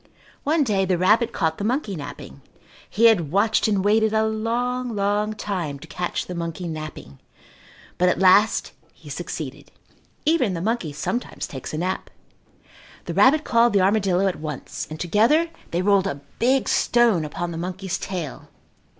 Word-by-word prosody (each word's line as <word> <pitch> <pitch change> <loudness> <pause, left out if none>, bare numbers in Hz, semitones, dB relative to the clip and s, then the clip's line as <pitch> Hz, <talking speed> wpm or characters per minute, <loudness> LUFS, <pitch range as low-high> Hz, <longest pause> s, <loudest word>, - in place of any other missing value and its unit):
One 305 +1 +2
day 205 -6 +1
the 185 -1 +1
rabbit 215 +6 +3
caught 160 -6 -1
the - - -3
monkey 225 -3 -1
napping. 145 - -9 0.5
He 225 +3 +2
had 180 -10 +4
watched 215 +5 +2
and 200 -2 +1
waited 220 +1 +3
a 220 0 +2
long, 235 +2 -2
long 205 +1 0
time 185 -9 -4
to 155 +4 -13
catch 175 +2 -3
the 180 - -6
monkey 170 +1 -4
napping, 155 - -7 0.8
but 180 0 +4
at - - +1
last 195 +3 +4 0.2
he - - -12
succeeded. - - -6 0.6
Even 290 - +2
the - - -3
monkey 205 -4 -1
sometimes 190 - -3
takes 130 -3 -7
a 155 - -4
nap. 185 +3 -2 1.0
The - - -4
rabbit 295 +4 +5
called 235 -3 +3
the 200 - +4
armadillo 195 -1 +2
at 190 -2 0
once 150 -3 -6
and 155 0 -7
together 230 - +3 0.2
they 175 +2 -1
rolled 200 -1 +3
a 140 -7 -4 0.2
big 260 +3 +2
stone 235 -8 +3
upon 170 +3 -4
the 165 - -5
monkey's 185 +1 -4
tail. 175 -7 -6
195 Hz, 165 wpm, -23 LUFS, 170-225 Hz, 1.0 s, rabbit